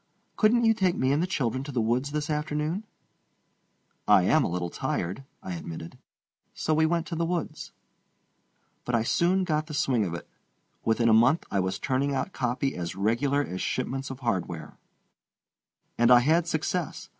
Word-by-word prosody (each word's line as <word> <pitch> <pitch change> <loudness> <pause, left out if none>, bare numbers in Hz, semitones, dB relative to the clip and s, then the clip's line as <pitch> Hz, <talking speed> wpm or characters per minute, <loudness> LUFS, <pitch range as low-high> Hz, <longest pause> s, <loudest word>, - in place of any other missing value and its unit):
Couldn't 230 +2 +4
you 225 - +5
take 185 -4 +1
me 130 +1 +1
and 145 +3 +2
the 180 - 0
children 130 - -1
to 145 - -6
the 125 - -1
woods 120 +5 0
this 150 0 -2
afternoon?" 150 +6 -2 1.2
"I - - +6
am - - +4
a - - 0
little 85 0 -3
tired," 95 +11 -3 0.2
I 95 - -5
admitted. 80 -1 -7 0.6
So 155 - 0
we 160 +1 +3
went 170 0 0
to 170 - -5
the 170 - 0
woods. 165 -2 -3 1.1
But 120 - -1
I 115 - +2
soon 180 +9 +2
got 155 -3 -1
the 155 - -6
swing 130 -6 +2
of 85 -2 -3
it. - - -8 0.6
Within 115 +1 +2
a 110 - +5
month 120 +9 +4
I 100 - +1
was 95 0 -1
turning 135 +5 0
out 135 +8 -2
copy 125 +2 -1
as 85 0 -4
regular 120 +8 +1
as 95 -8 -5
shipments 135 +1 -2
of 135 0 -8
hardware. 90 -9 -3 1.2
And 120 0 +5
I 125 -1 +8
had 160 +5 +2
success. 170 +1 -2
135 Hz, 180 wpm, -27 LUFS, 115-160 Hz, 1.2 s, I